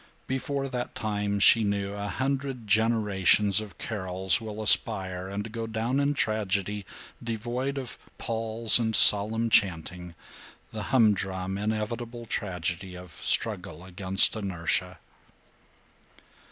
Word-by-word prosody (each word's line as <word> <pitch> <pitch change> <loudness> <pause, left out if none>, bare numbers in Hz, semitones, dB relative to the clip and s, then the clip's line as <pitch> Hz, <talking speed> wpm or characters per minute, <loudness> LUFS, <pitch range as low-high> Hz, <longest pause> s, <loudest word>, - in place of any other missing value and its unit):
Before 135 +1 -3
that 125 -2 -6
time, 105 -2 -3
she 115 +2 +6
knew, 100 -1 -2
a 100 0 -5
hundred 135 +2 -4
generations 105 -2 +3
of 105 -2 -11
Carols 95 -1 0
will 110 -1 -8
aspire 95 -2 +3
and 105 +3 -6
go 115 0 -5
down 115 +4 -2
in 140 +1 0
tragedy 105 -3 -2 0.4
devoid 120 +4 -4
of 130 -3 -6 0.2
palls 115 0 +2
and 110 -2 -1
solemn 110 +4 +6
chanting, 90 -2 0 0.6
the - - -5
humdrum 95 -5 0
inevitable 115 +3 -4
tragedy 90 -3 -4
of 90 -1 -12
struggle 85 +1 -2
against 95 +2 +2
inertia. 90 -2 -2
105 Hz, 115 wpm, -26 LUFS, 95-115 Hz, 0.6 s, she